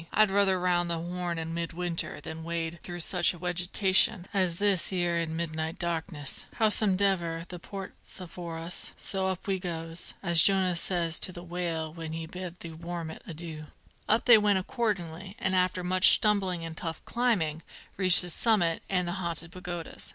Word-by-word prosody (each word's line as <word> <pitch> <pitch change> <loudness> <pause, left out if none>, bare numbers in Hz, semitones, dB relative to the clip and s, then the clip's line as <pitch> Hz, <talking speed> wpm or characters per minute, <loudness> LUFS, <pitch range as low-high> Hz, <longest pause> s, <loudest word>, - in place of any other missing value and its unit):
I'd 215 -2 +4
ruther 195 -2 +3
round 175 -1 +1
the 170 - -1
Horn 175 0 -3
in 165 0 -4
mid 170 0 -4
winter 175 -1 -3
than 160 0 -8
wade 165 0 -4
through 175 -1 -6
such 175 +1 +2
wegetation 180 +3 +3
as 185 -4 +1
this 200 -3 +2
'ere 175 -2 0
in 160 -1 -3
midnight 160 0 -3
darkness! 165 -4 -4
Howsomedever, 190 -6 +2
the 180 - -7
port's 195 +2 -8
afore 170 -2 -7
us, 165 +2 -7
so 190 -1 0
up 190 -1 -4
we 195 -2 -1
goes, 165 -2 -6
as 170 -3 +7
Jonah 190 -1 +4
says 170 -2 +1
to - - -1
the 175 -1 -9
whale 170 -3 -3
when 165 -1 -7
he 165 0 -5
bid 180 +1 -8
the 165 - -8
warmint 165 0 -7
adoo." 160 -2 -8 0.4
Up 220 +2 +3
they 240 -3 +8
went 205 -2 +3
accordingly, 190 -4 -3
and 185 - -1
after 185 0 +1
much 185 +1 +6
stumbling 190 -5 +3
and 165 -1 -7
tough 165 0 -6
climbing, 185 -11 0 0.3
reached 185 -2 +7
the 175 - -4
summit 175 -6 +2
and 180 -2 +1
the - - -1
Haunted 170 -1 -4
Pagodas. 175 -2 -7
175 Hz, 175 wpm, -28 LUFS, 165-190 Hz, 0.4 s, they